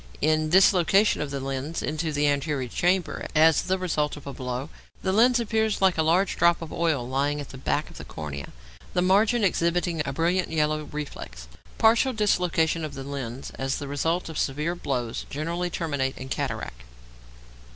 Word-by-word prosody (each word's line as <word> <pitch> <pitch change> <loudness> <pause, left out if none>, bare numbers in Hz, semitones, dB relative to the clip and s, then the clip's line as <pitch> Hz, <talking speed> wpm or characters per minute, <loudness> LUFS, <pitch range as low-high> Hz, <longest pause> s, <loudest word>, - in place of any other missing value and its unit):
In 155 +1 +2
dislocation 190 +3 +4
of 145 - -3
the 140 0 -3
lens 135 +4 -4
into 155 +1 -2
the 145 0 +1
anterior 145 -2 0
chamber 180 +6 0
as 160 +1 +5
the 190 0 0
result 155 -5 -1
of 145 - -12
a 140 - -6
blow, 125 +1 -5 0.3
the 190 - +1
lens 240 +4 +5
appears 220 -1 0
like 190 -2 +4
a 160 - +1
large 175 +5 +2
drop 170 0 +4
of 160 - -8
oil 160 -8 0
lying 140 +3 0
at 145 - -7
the 135 - -9
back - - -1
of - - -12
the - - -7
cornea, 70 -3 -6 0.5
the 180 - +3
margin 210 +5 +3
exhibiting 170 -2 +1
a 140 - -3
brilliant 170 +5 0
yellow 155 -1 0
reflex. 145 - -7 0.3
Partial 230 +4 +4
dislocations 180 -6 +1
of 150 -2 -5
the 135 - -6
lens 135 -2 -6
as 135 +1 -1
the 145 - -6
result 160 +5 -1
of 160 -2 -5
severe 150 +5 -1
blows 125 -9 -3
generally 170 +5 -2
terminate 145 -6 -2
in 130 0 -7
cataract. - - -4
155 Hz, 180 wpm, -26 LUFS, 140-180 Hz, 0.5 s, as